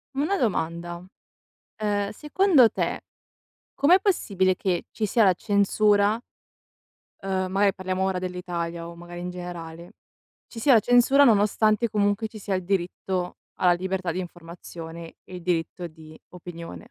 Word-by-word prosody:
Una 305 +9 0
domanda. 175 - -2 0.7
Ehm, 205 -1 -1
secondo 300 - +4
te, - - -2 0.7
com'è 340 +7 +5
possibile 200 - +1
che 180 -1 -1
ci 220 - -3
sia 215 +2 +3
la 185 - +5
censura, 205 +1 +2 1.0
ehm- 190 -1 -2
magari 195 +1 +2
parliamo 185 0 -2
ora 190 -1 -1
dell'Italia 175 -2 -4
o 170 - -9
magari 175 +1 -10
in 180 - -4
generale- 175 -1 -8 0.5
ci 230 - -9
sia 265 +2 +5
la - - +8
censura 245 +5 +5
nonostante 215 0 +3
comunque 205 +1 0
ci 215 - -11
sia 200 -1 -3
il 185 - -1
diritto 185 -1 -2 0.2
alla 180 -1 +3
libertà 185 -1 -2
di 185 - -3
informazione 170 -1 -9
e 185 - -12
il 180 - -9
diritto 175 0 -2
di 155 -1 -14
opinione? 175 +5 -10
185 Hz, 140 wpm, -25 LUFS, 175-215 Hz, 1.0 s, la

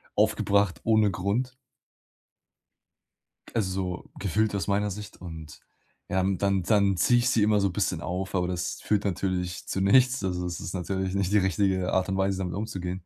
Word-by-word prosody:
aufgebracht, 100 -2 +2
ohne 110 -2 +4
Grund. 100 +8 -1 2.0
Also 95 -4 -2
so - - -22
gefühlt 105 +2 0
aus 100 -4 -2
meiner 100 +1 +1
Sicht 105 +1 -8
und 80 -5 -9 0.5
ja, 95 - +1
und 95 0 0
dann 100 -1 +1
dann 100 -1 +3
ziehe 120 +6 +4
ich 120 +1 +2
sie 115 - +2
immer 105 0 +3
so 100 - +2
bisschen 90 - -1
auf, 95 +3 -3
aber 90 -1 +1
das 90 -1 -3
führt 105 -1 0
natürlich 90 -2 -2
zu - - -3
nichts. 125 +6 +4
Also 90 -1 -2
das 90 -1 -4
ist 85 - -6
natürlich 95 +1 -2
nicht 100 -1 0
die 105 - +4
richtige 95 -1 +1
Art 95 0 +1
und 95 - -1
Weise, 95 0 +1
damit 90 -2 -3
umzugehen. 95 -3 -4
95 Hz, 180 wpm, -27 LUFS, 90-105 Hz, 2.0 s, ohne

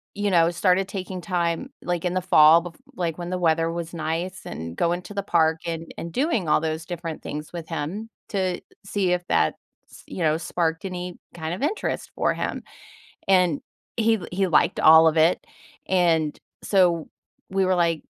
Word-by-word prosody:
you 205 -1 0
know, 170 -1 +5
started 185 +2 +2
taking 185 -2 -5
time, 175 +6 -1
like, 175 0 -2
in 180 - -1
the 185 - +1
fall, 165 -2 +7
bef 175 -2 -9 0.2
like, 170 -3 -2
when 175 - -5
the 185 - -1
weather 165 -1 +2
was 170 0 -5
nice 165 +3 -3
and 80 +1 -6
going 175 - 0
to 205 - -10
the 200 - -1
park 160 -3 +2
and 165 0 -5
and 170 - -6
doing 250 - 0
all - - +4
those 160 0 -3
different 170 -3 -5
things 150 +3 -6
with 170 -1 -7
him 170 +8 -4 0.2
to 185 -3 -1 0.2
see 195 -2 0
if 175 0 -2
that, 80 - +2 0.4
s - - -14
you 175 - -4
know, 155 0 +3
sparked 165 0 -2
any 180 -1 -5 0.2
kind 160 0 -4
of 185 - -6
interest 355 +9 -2
for - - +1
him, - - -4 0.6
and 180 -6 +3 0.4
he 225 0 +3
he 190 +1 +1
liked 165 - +3
all 160 +1 +8
of 160 0 +2
it. 160 +3 +3 0.4
And 165 -5 +2 0.2
so, 175 -5 +2 0.4
we 190 0 +1
were 185 0 +2
like 170 -2 +1
175 Hz, 185 wpm, -24 LUFS, 160-185 Hz, 0.6 s, all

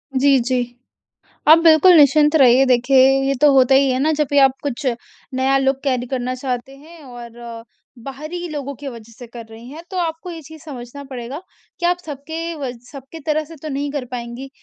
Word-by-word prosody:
जी, 275 0 +4
जी। 245 0 -2 0.8
आप 320 +1 +9
बिल्कुल 325 +3 +7
निश्चिंत 300 +1 +5
रहिए 260 -1 +5
देखिए 255 +2 +3 0.3
ये 275 - +1
तो 295 -2 +5
होता 265 0 +4
ही 270 0 +4
है 255 - 0
ना 315 +1 +2
जब 300 -1 0
भी 285 - +2
आप 270 -1 +5
कुछ 280 -1 -4 0.5
नया 265 +1 +1
लुक 270 0 0
कैरी 250 -2 -1
करना 255 0 -3
चाहते 255 +1 -5
हैं 320 +3 -16
और 235 -2 -10 0.4
बाहरी 310 +6 -7
लोगों 280 -2 -5
के 280 +1 -8
वज़ह 230 -2 -11
से 245 - -10
कर 235 0 -10
रही 230 +2 -12
हैं। 320 +3 -10
तो 375 - -6
आपको 330 +2 -4
ये 330 -1 -8
चीज़ 315 +1 -14
समझना 280 -2 -9
पड़ेगा 255 +5 -7 0.4
कि 345 - +1
आप 355 0 +2
सबके 320 +4 -6
वज 250 -3 -6
सबके 275 +4 -11
तरह 310 0 0
से 325 +1 -13
तो 310 - -5
नहीं 285 0 -3
कर 285 -4 -3
पाएँगी 245 +2 -7
275 Hz, 200 wpm, -19 LUFS, 250-305 Hz, 0.8 s, आप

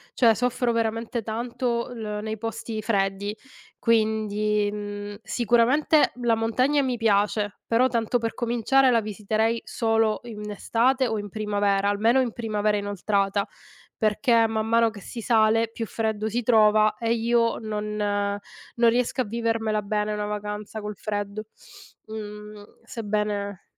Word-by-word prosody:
cioè 230 -3 +5
soffro 245 +1 0
veramente 230 +1 -1
tanto 235 +2 -2
l 210 -3 -4
nei 220 -1 -4
posti 225 -1 -4
freddi. 200 -1 -1 0.4
Quindi, 215 -2 +1
mhmm, 205 0 -6
sicuramente, 245 +7 +3
la 240 -1 +3
montagna 250 +6 +2
mi 255 -2 -1
piace, 205 -1 +1
però, 240 +3 +3
tanto 235 0 0
per 230 -1 -3
cominciare, 245 +3 +2
la 235 -2 +3
visiterei 215 +2 -1
solo 225 -1 +1
in 210 -3 -7
estate 250 +5 +1
o 220 -3 -1
in 205 0 -6
primavera- 205 -1 0
almeno 225 +5 +3
in 250 -3 +1
primavera 215 -2 0
inoltrata- 200 0 0 0.5
perché, 230 +2 +3
man 220 0 -1
mano 230 0 +4
che 205 -2 -11
si 230 - -7
sale, 225 0 +3
più 230 0 -4
freddo 220 -1 -2
si 240 +3 -1
trova 215 -2 +4
e 230 0 +1
io 230 0 +1
non 210 -1 -4
non 205 +3 -1
riesco 245 +2 +1
a - - +1
vivermela 225 -1 -1
bene, 210 +1 -1
una 210 0 -2
vacanza 210 +1 -5
col 210 0 -5
freddo. 205 +1 -4 0.6
Mhmm, 210 -1 -8 0.2
sebbene 205 -3 -3
220 Hz, 140 wpm, -25 LUFS, 210-230 Hz, 0.6 s, cioè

